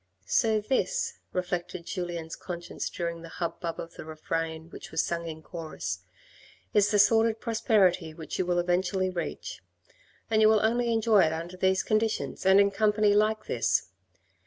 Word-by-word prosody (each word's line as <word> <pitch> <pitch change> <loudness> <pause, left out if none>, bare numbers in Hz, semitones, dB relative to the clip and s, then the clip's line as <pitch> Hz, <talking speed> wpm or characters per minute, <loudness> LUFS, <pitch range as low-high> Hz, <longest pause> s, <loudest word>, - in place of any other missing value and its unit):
" - - -39
So 220 - +2
this," 465 - -1
reflected 180 -1 -3
Julien's 170 -3 -4
conscience 175 -1 -5
during 170 -1 -4
the 165 - -10
hubbub 170 -1 -3
of 165 - -7
the - - -9
refrain 160 +1 -4
which - - -9
was 160 - 0
sung 170 -1 -3
in 160 -1 -7
chorus, 155 - -5 0.4
" - - -26
is 205 -1 +4
the 210 - +2
sordid 225 +2 +4
prosperity 205 -8 +2
which 155 0 -7
you 185 - 0
will 175 0 +1
eventually 180 +2 +1
reach, 185 - -5 0.7
and 220 -1 +2
you 215 - +7
will 215 -1 +4
only 235 +1 +1
enjoy 225 -2 +4
it 160 - 0
under 170 +3 -5
these 190 +1 +2
conditions 215 -3 -1
and 190 +1 +7
in 200 0 +4
company 210 0 +3
like 215 +1 +2
this. 115 -6 0
185 Hz, 170 wpm, -28 LUFS, 170-215 Hz, 0.7 s, you